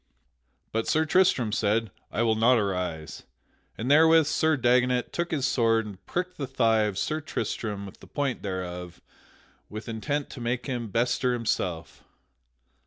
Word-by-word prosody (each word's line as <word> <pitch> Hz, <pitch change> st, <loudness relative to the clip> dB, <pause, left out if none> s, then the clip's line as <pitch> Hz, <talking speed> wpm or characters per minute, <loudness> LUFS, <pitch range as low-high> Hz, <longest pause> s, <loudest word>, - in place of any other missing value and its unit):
But 115 Hz, 0 st, -1 dB
Sir 155 Hz, +1 st, +2 dB
Tristram 155 Hz, -, +3 dB
said, 110 Hz, 0 st, +1 dB, 0.2 s
"I 115 Hz, -, 0 dB
will 115 Hz, -1 st, +3 dB
not 115 Hz, +3 st, +4 dB
arise." 90 Hz, -6 st, -3 dB, 0.6 s
And 120 Hz, +5 st, -1 dB
therewith 160 Hz, +1 st, +6 dB
Sir 155 Hz, +1 st, +2 dB
Dagonet 125 Hz, 0 st, +2 dB
took 170 Hz, 0 st, -1 dB
his 145 Hz, -5 st, 0 dB
sword 115 Hz, -4 st, +2 dB
and 100 Hz, -3 st, -10 dB
pricked 180 Hz, +1 st, -3 dB
the 140 Hz, -, -2 dB
thigh 115 Hz, -4 st, +2 dB
of 105 Hz, -3 st, -3 dB
Sir 155 Hz, +1 st, -1 dB
Tristram 105 Hz, -8 st, -4 dB
with 95 Hz, -, -12 dB
the -, -, -14 dB
point 140 Hz, -3 st, -2 dB
thereof 90 Hz, -2 st, -5 dB, 0.7 s
with 110 Hz, +1 st, -7 dB
intent 140 Hz, +6 st, -3 dB
to 125 Hz, -, -8 dB
make 120 Hz, +1 st, -2 dB
him 120 Hz, -4 st, -3 dB
bestir 120 Hz, +3 st, +1 dB
himself. 90 Hz, -, -3 dB
115 Hz, 155 wpm, -27 LUFS, 105-140 Hz, 0.7 s, therewith